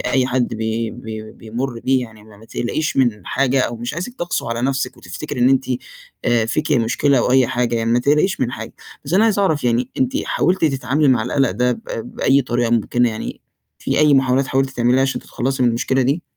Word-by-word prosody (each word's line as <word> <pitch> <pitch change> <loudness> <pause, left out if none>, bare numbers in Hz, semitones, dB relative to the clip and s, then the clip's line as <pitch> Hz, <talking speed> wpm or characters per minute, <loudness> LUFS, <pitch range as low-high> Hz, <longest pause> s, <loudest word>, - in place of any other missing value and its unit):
أي 125 +1 +1
حد 130 -2 0
بي 110 +1 -2
بي 110 -1 -8
بيمُر 115 +2 -5
بيه، 130 0 +2
يعني 110 -2 -15
ما 110 -2 -16
ما 110 - -16
تقلقيش 150 +7 -2
من 115 -7 +1
حاجة، 135 0 +1
أو 120 -2 -1
مش 120 +4 -5
عايزِك 185 +9 -5
تَقسو 175 -7 -2
على 115 +1 -2
نفسِك، 135 0 -1
وتفتكري 125 - -6
إن 125 - +5
أنتِ 135 0 +3 0.6
آآ 120 -2 +2
فيكِ 155 +6 -1
مشكلة 130 +2 +2
أو 125 - +1
أي 130 -2 +5
حاجة، 120 -1 0
يعني 115 0 0
ما 120 - +4
تقلقيش 150 +9 +2
من 125 - +1
حاجة، - - -7 0.3
بس 150 - -2
أنا 210 +4 +5
عايز 215 -3 +2
أعرف 160 -9 +1
يعني 120 +1 +1
أنتِ 130 -1 +1
حاولتِ 185 -1 +1
تتعاملي 140 0 +1
مع 125 -4 +3
القلَق 125 +2 +1
ده 125 +5 +1
ب - - -8 0.3
بأي 140 +1 +3
طريقة 120 -1 -1
مُمكنة، 120 +1 +2
يعني 110 - -6 0.4
في - - -1
أي 150 -1 +5
محاولات 135 0 +2
حاولتِ 135 0 0
تعمليها، 125 +1 +2
عشان 135 - -1
تتخلّصي 130 +1 -2
من 120 - +4
المشكلة 130 +3 +1
دي؟ 140 +7 0
125 Hz, 215 wpm, -19 LUFS, 120-135 Hz, 0.6 s, إن